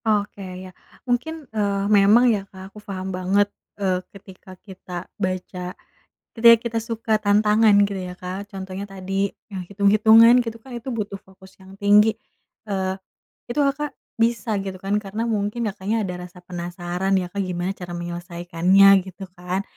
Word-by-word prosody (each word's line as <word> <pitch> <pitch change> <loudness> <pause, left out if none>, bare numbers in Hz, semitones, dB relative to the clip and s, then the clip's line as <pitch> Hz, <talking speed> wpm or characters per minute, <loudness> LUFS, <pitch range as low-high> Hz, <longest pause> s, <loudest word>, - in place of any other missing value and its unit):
Oke 205 -2 0 0.2
ya. 185 - -12 0.3
Mungkin, 295 +6 -2
eee, 200 -2 0
memang 210 +5 +6
ya 205 - -1
Kak 190 0 -12
aku 210 - -11
paham 190 -2 -5
banget, 190 +3 +2 0.3
eee, 185 -2 0
ketika 190 -1 -14
kita 185 -2 -9 0.2
baca, 185 -1 -4 0.6
ketika 230 0 +8
kita 230 -1 -1
suka 225 0 -3
tantangan 210 +1 +4
gitu 195 -2 -5
ya 180 - -11
Kak, 190 +3 -6
contohnya 190 -1 -6
tadi, 195 +1 -2 0.2
yang 195 -4 -6
hitung-hitungan 220 +4 +6
gitu 230 -1 -6
kan 245 +2 -12
itu 240 +2 -6
butuh 210 -4 -4
fokus 190 0 -18
yang 190 +1 -14
tinggi. 210 +2 +4 0.5
Eee, 190 -2 -2 0.5
itu 240 - -5
Kakak, 285 0 -2 0.2
bisa 225 -2 +1
gitu 195 -1 -5
kan 200 +2 +1
karena 210 +2 -4
mungkin 215 +1 -1
Kakaknya 205 +3 -2
ada 180 -1 -6
rasa 180 0 -17
penasaran 175 +2 -3
ya 180 -1 -3
Kak 200 - -5
gimana 175 +1 -2
cara 175 -2 -8
menyelesaikannya 175 +2 +2 0.2
gitu 190 +1 -9
kan. 180 +2 -3
195 Hz, 155 wpm, -22 LUFS, 185-215 Hz, 0.6 s, ketika